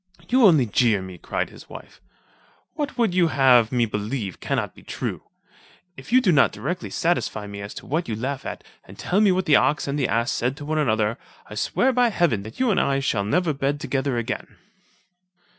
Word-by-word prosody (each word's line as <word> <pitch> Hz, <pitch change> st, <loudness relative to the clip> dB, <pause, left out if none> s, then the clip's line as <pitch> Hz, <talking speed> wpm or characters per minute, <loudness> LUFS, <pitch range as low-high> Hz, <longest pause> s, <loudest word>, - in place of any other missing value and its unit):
"You 250 Hz, -3 st, +6 dB
only 155 Hz, -9 st, +5 dB
jeer 110 Hz, -1 st, +2 dB
me," 95 Hz, -2 st, -9 dB
cried -, -, -3 dB
his -, -, -15 dB
wife, -, -, -12 dB, 0.7 s
"what 295 Hz, -2 st, -2 dB, 0.2 s
you 180 Hz, -1 st, +3 dB
would 160 Hz, -, -1 dB
have 125 Hz, -4 st, +5 dB
me 120 Hz, -2 st, +2 dB
believe 105 Hz, -1 st, -4 dB
cannot -, -, -2 dB
be -, -, -16 dB
true. -, -, -5 dB, 0.7 s
If -, -, -12 dB
you 255 Hz, +1 st, +6 dB
do 195 Hz, -, +3 dB
not 150 Hz, -4 st, +4 dB
directly 180 Hz, 0 st, -4 dB
satisfy 165 Hz, -11 st, -1 dB
me 100 Hz, 0 st, -8 dB
as 100 Hz, +1 st, -8 dB
to -, -, -9 dB
what 160 Hz, +5 st, -2 dB
you 110 Hz, -, -2 dB
laugh 135 Hz, +4 st, -4 dB
at, -, -, -6 dB, 0.2 s
and -, -, -14 dB
tell 195 Hz, +4 st, 0 dB
me 205 Hz, -3 st, +5 dB
what 185 Hz, 0 st, 0 dB
the 150 Hz, -, +6 dB
ox 150 Hz, -1 st, +1 dB
and 140 Hz, +1 st, -2 dB
the 135 Hz, -, +1 dB
ass 115 Hz, +1 st, 0 dB
said 125 Hz, +3 st, -1 dB
to 145 Hz, -, -8 dB
one 155 Hz, +1 st, -1 dB
another, 110 Hz, -5 st, 0 dB, 0.3 s
I -, -, -10 dB
swear 255 Hz, -, +1 dB
by 245 Hz, -1 st, +3 dB
heaven 170 Hz, -, +1 dB
that 110 Hz, +2 st, -11 dB
you 255 Hz, -3 st, +2 dB
and -, -, +2 dB
I 135 Hz, 0 st, +1 dB
shall 115 Hz, -7 st, 0 dB
never 160 Hz, -, +1 dB
bed 140 Hz, +1 st, -1 dB
together 135 Hz, -3 st, -1 dB
again." 115 Hz, -, -4 dB
135 Hz, 210 wpm, -23 LUFS, 110-175 Hz, 0.7 s, You